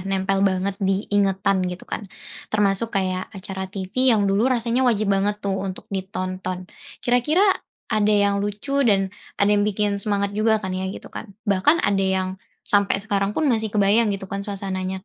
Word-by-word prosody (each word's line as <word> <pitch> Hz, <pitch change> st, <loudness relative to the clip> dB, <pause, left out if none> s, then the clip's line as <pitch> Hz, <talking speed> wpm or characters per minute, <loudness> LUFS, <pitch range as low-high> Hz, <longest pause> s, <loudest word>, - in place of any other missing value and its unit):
nempel 195 Hz, 0 st, 0 dB
banget 195 Hz, 0 st, +1 dB
di 195 Hz, +1 st, 0 dB
ingatan, 195 Hz, -1 st, +2 dB
gitu 180 Hz, 0 st, -7 dB
kan. 205 Hz, -, -6 dB, 0.4 s
Termasuk 205 Hz, +1 st, +1 dB
kayak 185 Hz, -1 st, -1 dB
acara 190 Hz, -1 st, -6 dB
tivi 195 Hz, +7 st, +1 dB
yang 220 Hz, -4 st, +4 dB
dulu 200 Hz, +5 st, +2 dB
rasanya 240 Hz, 0 st, +1 dB
wajib 215 Hz, -3 st, +2 dB
banget 200 Hz, +1 st, +1 dB
tuh, 195 Hz, -1 st, -1 dB
untuk 190 Hz, -1 st, -5 dB
ditonton. 185 Hz, -1 st, -4 dB, 0.4 s
Kira-kira 250 Hz, +10 st, +3 dB, 0.5 s
ada 210 Hz, -1 st, +2 dB
yang 200 Hz, -1 st, +3 dB
lucu 205 Hz, +8 st, -1 dB
dan 195 Hz, -2 st, +2 dB, 0.2 s
ada 200 Hz, +1 st, +3 dB
yang 205 Hz, -, +3 dB
bikin 205 Hz, -1 st, 0 dB
semangat 200 Hz, -1 st, -1 dB
juga 220 Hz, +2 st, +2 dB
kan, 190 Hz, -, -3 dB
ya, 185 Hz, 0 st, -2 dB
gitu 190 Hz, -, -9 dB
kan? 230 Hz, -, -7 dB, 0.2 s
Bahkan 205 Hz, -, +3 dB
ada 200 Hz, -1 st, +2 dB
yang 190 Hz, -1 st, +1 dB, 0.4 s
sampai 200 Hz, -1 st, +2 dB
sekarang 200 Hz, 0 st, -1 dB
pun 315 Hz, -, +1 dB
masih 225 Hz, -5 st, +1 dB
kebayang, 210 Hz, +2 st, +3 dB
gitu 195 Hz, -, -9 dB
kan, 200 Hz, -, -2 dB
suasananya. 190 Hz, -2 st, -4 dB
200 Hz, 170 wpm, -22 LUFS, 190-210 Hz, 0.5 s, yang